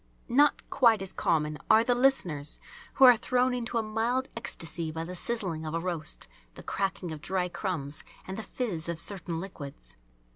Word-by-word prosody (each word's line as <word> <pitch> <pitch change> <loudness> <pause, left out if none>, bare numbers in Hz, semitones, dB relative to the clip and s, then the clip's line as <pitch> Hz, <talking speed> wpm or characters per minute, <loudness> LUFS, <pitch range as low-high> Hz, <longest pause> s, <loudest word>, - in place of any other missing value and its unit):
Not 285 +4 +3
quite 225 -6 +4
as 190 - -7
common 150 -1 0
are 220 - +7
the 245 +1 +2
listeners 185 - +2 0.4
"who 265 - +7
are 250 -2 +9
thrown 250 +2 +1
into 240 -1 -2
a 225 - +1
mild 230 +4 -1
ecstasy 165 -7 -3
by 160 +1 -4
the 180 +2 -6
sizzling 185 -6 -2
of 155 +1 -4
a - - +1
roast, 170 - -2 0.3
the - - -11
cracking 190 -3 -2
of 155 -2 -7
dry 185 +1 -1
crumbs, 150 -6 -4 0.2
and 190 - -5
the 220 - -4
fiz 195 -7 -3
of 170 -1 -3
certain 175 -3 -1
liquids." 140 - -8
190 Hz, 180 wpm, -29 LUFS, 160-235 Hz, 0.4 s, are